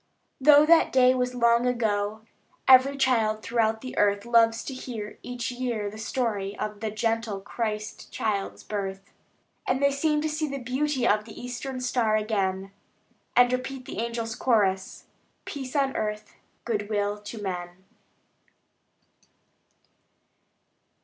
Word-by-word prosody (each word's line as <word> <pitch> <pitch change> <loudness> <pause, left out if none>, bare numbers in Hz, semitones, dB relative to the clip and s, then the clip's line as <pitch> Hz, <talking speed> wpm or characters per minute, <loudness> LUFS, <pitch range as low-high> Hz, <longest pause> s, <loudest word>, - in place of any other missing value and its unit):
Though 295 +2 +7
that 330 +1 +5
day 255 -1 +5
was 250 -1 -1
long 235 0 +3
ago, 215 -3 -1 0.4
Every 265 +2 +7
child 225 -5 +1
throughout 225 -1 +1
the 255 - -7
earth 205 0 +2
Loves 230 -1 +3
to 270 - -6
hear 230 -5 -7
each 245 -1 -4
year 240 -5 -3
the 215 - -10
story 215 -4 -2
Of 210 -1 -4
the 220 0 -2
gentle 225 -1 -1
Christ 210 +1 -5
Child's 205 -3 -2
birth. 195 -1 -5 0.5
And 255 +1 +1
they 280 0 +3
seem 300 +2 +1
to 315 - 0
see 310 0 -2
the 275 -1 -4
beauty 260 +2 -1
Of 210 0 +2
the 220 - -11
eastern 250 +1 -5
star 240 -3 +1
again; 195 -3 -1 0.6
And 245 0 +5
repeat 255 0 -4
the - - -6
angels' 230 -1 -3
chorus: 205 -6 0 0.4
"Peace 265 -2 -6
on 275 -2 +1
earth, 210 0 -3 0.3
good 210 -3 -2
will 205 -1 -1
to 210 +2 -8
men." 180 -2 -5
230 Hz, 135 wpm, -26 LUFS, 210-255 Hz, 0.6 s, Though